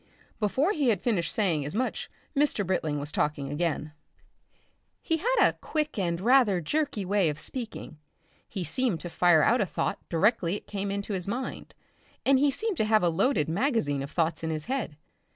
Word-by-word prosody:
Before 260 - +1
he 295 - +1
had 210 -5 +2
finished 195 -6 0
saying 175 -9 +1
as 150 +7 -5
much 255 +3 -2 0.3
Mr. 280 -8 +1
Britling 160 -5 -1
was 145 +2 -5
talking 145 -2 -1
again. 155 -1 -2 1.1
He 325 - 0
had - - 0
a - - +5
quick 305 -7 -2
and 170 -3 -1
rather 230 -3 +4
jerky 270 - -1
way 195 -3 +2
of 150 - -4
speaking; 220 - -5 0.5
he 190 - -4
seemed 180 - 0
to 175 - -7
fire 175 -3 +4
out 240 +1 +3
a - - +2
thought 150 - -2
directly 185 0 +2
it - - -8
came 200 -1 -4
into 200 +1 -3
his 185 -1 -1
mind, 245 +6 -5 0.5
and 270 0 +5
he 290 +1 +4
seemed 425 - -2
to 220 - +2
have 215 -2 +3
a 175 - +4
loaded 185 - +1
magazine 170 - 0
of 140 - -5
thoughts 165 0 0
in 160 - -1
his 155 -1 -3
head. 250 - -3
200 Hz, 190 wpm, -28 LUFS, 165-255 Hz, 1.1 s, a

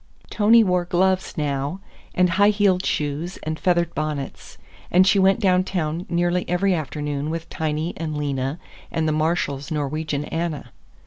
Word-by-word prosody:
Tony 225 +2 +5
wore 180 -3 +1
gloves 185 +2 +1
now, 145 +3 -2 0.4
and 180 -1 +3
high 200 +4 +4
heeled 200 -3 +2
shoes 150 +5 -2
and 155 0 -3
feathered 170 -2 +1
bonnets, 150 -3 -5 0.3
and 185 +1 +5
she 195 +1 +4
went 190 +3 +4
downtown 180 -3 0
nearly 175 +1 +1
every 185 +2 +2
afternoon 150 -2 -3
with 165 0 -4
Tiny 155 +1 -2
and 155 -2 -3
Lena 140 0 -2 0.3
and 160 -1 -1
the - - +2
Marshalls' 155 -3 -1
Norwegian 150 0 -2
Anna. 160 -7 -4
165 Hz, 145 wpm, -23 LUFS, 150-180 Hz, 0.4 s, Tony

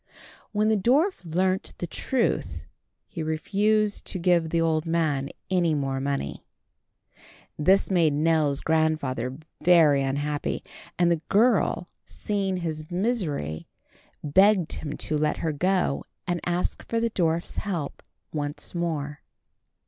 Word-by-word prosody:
When 215 0 +2
the 220 - +4
dwarf 270 - +2
learnt 185 +3 -1
the - - -3
truth, 235 +7 -1 0.4
he 170 - -6
refused 205 +7 +1
to - - -4
give 175 -2 +2
the 170 - +1
old 160 -1 +1
man 155 -5 0 0.2
any 175 -4 +2
more 135 -2 -1
money. 135 - -3 1.2
This 190 +6 +3
made 165 -5 +3
Nell's 150 -2 +2
grandfather 150 -6 0 0.3
very 160 -6 +6
unhappy, 145 +2 -2 0.3
and 175 -1 +3
the 165 -2 +1
girl, 205 -5 +3 0.2
seeing 195 -3 -2
his 155 -3 -4
misery, 175 - -2 0.6
begged 190 +4 +4
him 150 -2 -5
to 155 -1 -1
let 150 0 +1
her 160 - -1
go 180 0 0 0.2
and 175 -1 -1
ask 175 +1 -1
for 230 - +1
the 230 0 0
dwarf's 170 -3 0
help 175 -9 -3 0.3
once 145 0 -4
more. 155 -4 -3
165 Hz, 125 wpm, -26 LUFS, 150-190 Hz, 1.2 s, very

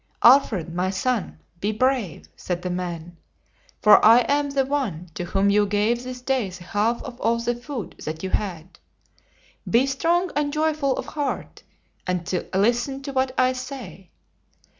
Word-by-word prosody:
"Alfred, 220 - +5
my 180 +2 0
son, 195 - -1 0.2
be 205 +4 0
brave," 215 - -1
said 175 - -4
the 180 - -2
man; 175 -1 -5 0.7
"for 210 - +7
I 230 +3 +8
am 285 +3 +1
the 275 -1 +1
one 225 - -2
to 175 - -4
whom 195 +3 +2
you 205 0 +3
gave 210 +4 +1
this 250 0 -7
day 255 -5 0
the 180 -1 -10
half 215 +6 0
of 245 0 -9
all 230 +1 +2
the 235 +1 -1
food 240 -1 -7
that 155 +2 -5
you 190 - -3
had. 180 -4 -3 0.9
Be 235 +3 +4
strong 340 +6 +1
and 290 0 0
joyful 305 -3 0
of - - -4
heart, 290 -2 -4 0.5
and 180 -1 -2 0.2
listen 240 +7 +1
to 275 0 -6
what 260 0 0
I 255 0 +3
say. 255 - -8
235 Hz, 160 wpm, -23 LUFS, 185-265 Hz, 0.9 s, I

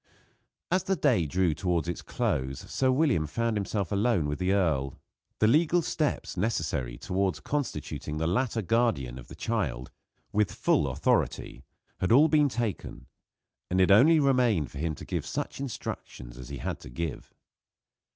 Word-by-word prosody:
As 185 +1 +3
the 195 - +1
day 120 - +2
drew 90 +1 +1
towards 85 0 -1
its 85 - -3
close 65 0 -2
Sir 130 - 0
William 130 - +2
found 115 +7 -1
himself 100 -2 -2
alone 100 -5 +2
with 75 0 -3
the 90 +1 +1
earl. 80 -9 0 0.4
The - - +3
legal 165 +8 +3
steps 155 -1 -2
necessary 75 - -1
towards 95 +3 -1
constituting 75 - -3
the 80 - -1
latter 110 +5 0
guardian 95 - 0
of - - -12
the - - -11
child, 65 +1 -2 0.4
with 105 -1 +1
full - - +1
authority, - - -1 0.3
had 95 - 0
all 145 +7 +6
been 150 -2 +4
taken, 115 - -4 0.6
and 90 - +1
it 95 +1 +5
only 150 +11 +7
remained 125 - +2
for 70 - -8
him 80 0 -1
to - - -10
give - - -2
such - - -4
instructions 65 - -6
as 65 -1 -10
he 70 - -5
had - - -4
to - - -11
give. 75 +4 -5
95 Hz, 160 wpm, -28 LUFS, 75-125 Hz, 0.6 s, only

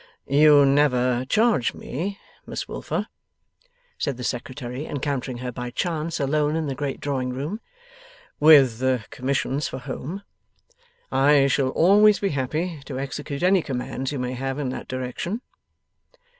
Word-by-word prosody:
'You 145 0 +6
never 130 -3 +2
charge 215 - +2
me, 190 +9 -4 0.3
Miss - - -5
Wilfer,' - - -3 0.9
said 140 -3 -1
the 125 - -6
Secretary, 125 +2 -4
encountering 140 -3 -3
her 125 - -2
by 125 0 -5
chance 165 +4 -2
alone 150 +2 +1
in 160 -1 -1
the 140 - -2
great 140 0 -4
drawing 130 -3 -2
room, 145 - -4 0.8
'with 140 -6 +6 0.3
commissions 135 +2 -1
for - - -6
home. 160 +9 -6 0.9
I 140 +1 +5
shall 135 -1 +2
always 205 +8 +5
be 200 - -1
happy 150 +3 -2
to 130 - -6
execute 140 +2 -4
any 185 0 +4
commands 130 -1 -4
you 145 - -3
may 125 0 -2
have 135 +1 -3
in 140 -3 -2
that 130 - -6
direction. 130 - -4
140 Hz, 140 wpm, -24 LUFS, 130-155 Hz, 0.9 s, You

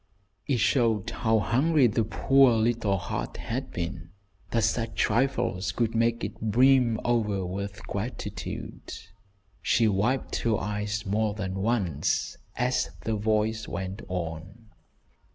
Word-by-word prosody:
It 135 - +2
showed 115 -3 +2
how 110 -1 +1
hungry 135 +7 +3
the 115 0 +2
poor 135 +4 +4
little 110 -3 +1
heart - - -4
had - - -4
been, 85 0 -5 0.4
that 115 -2 +1
such 115 0 0
trifles 105 -6 +1
could 115 -2 0
make 115 +1 +1
it 100 +1 -5
brim 120 +1 +4
over 105 -5 +1
with 100 +3 -5
gratitude. 105 +4 -5 0.7
She 115 - +3
wiped 110 +6 0
her 115 -2 +1
eyes 105 +1 -3
more 105 +1 0
than 95 -3 -3
once 95 - 0 0.2
as 125 +1 0
the 110 - -2
voice 110 +1 0
went 95 +2 -5
on. 90 +5 -6
110 Hz, 125 wpm, -27 LUFS, 100-120 Hz, 0.7 s, poor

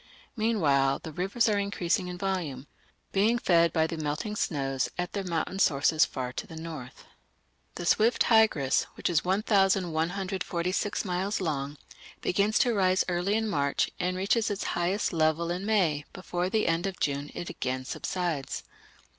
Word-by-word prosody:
Meanwhile 150 - +2
the 160 - -6
rivers 195 +9 0
are 210 -2 +2
increasing 190 -2 0
in 180 0 -5
volume, 175 -9 -3 0.5
being 215 +5 +3
fed 170 -7 +3
by 160 -1 +2
the 165 0 -4
melting 155 +8 -3
snows 135 -8 -1
at 180 0 -3
their 200 - -2
mountain 180 +2 -2
sources 155 0 +4
far 125 -2 -5
to - - -5
the 160 - -10
north. 160 -6 -8 0.7
The 175 - -5
swift 220 +7 +3
Tigris, 215 - +3
which - - -1
is 160 - +2
1146 190 -1 0
miles 190 +3 -1
long, 145 -5 -2 0.4
begins 205 +4 +1
to 245 -2 +3
rise 190 -2 +3
early 180 +3 0
in 220 0 0
March 140 -8 0
and 180 0 -1
reaches 200 +4 +1
its 205 -1 -2
highest 180 +4 0
level 160 +1 +1
in 185 +4 -3
May; 165 -9 +2
before 180 -1 -3
the 215 +2 +1
end 165 +3 +1
of 190 -2 -5
June 140 0 -1
it 175 - -5
again 130 0 -3
subsides. 170 -3 -3
180 Hz, 155 wpm, -28 LUFS, 155-200 Hz, 0.7 s, sources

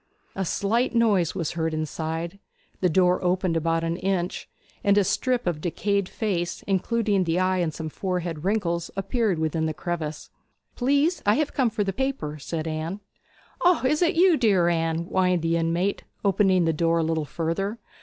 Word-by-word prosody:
A 195 - -1
slight 230 +8 0
noise 205 -8 +3
was 170 -5 -2
heard 160 -1 -2
inside, 160 +3 -4 0.4
the 180 - +2
door 180 +2 +3
opened 180 -1 +1
about 165 0 +1
an 165 +1 -1
inch, 185 -2 -2 0.3
and 200 0 +4
a 205 - +5
strip 245 +6 0
of 170 -4 -1
decayed 200 +3 -1
face, 180 -6 -2
including 200 0 +1
the 165 0 0
eye 185 0 +1
and 170 -3 0
some 160 +1 -6
forehead 175 -2 -3
wrinkles, 175 -4 0
appeared 195 0 0
within 160 0 0
the 155 - -3
crevice. 160 -3 -4 0.4
'Please 285 +6 +2
I 205 +1 +4
have 300 0 0
come 260 -4 +2
for 215 -1 -1
the 195 -1 -2
paper,' 220 - -3
said 160 +3 -4
Anne. 160 +5 -3 0.6
'O, 355 -4 +4
is 300 +5 +2
it 340 -2 +3
you, 350 -1 +5
dear 195 -9 +3
Anne?' 165 0 0
whined 180 -1 +1
the 165 0 +1
inmate, 170 +4 0 0.2
opening 190 -2 +3
the 165 - +2
door 165 +1 +1
a 165 - +2
little 160 -1 0
further. 170 - -2
180 Hz, 175 wpm, -25 LUFS, 165-205 Hz, 0.6 s, a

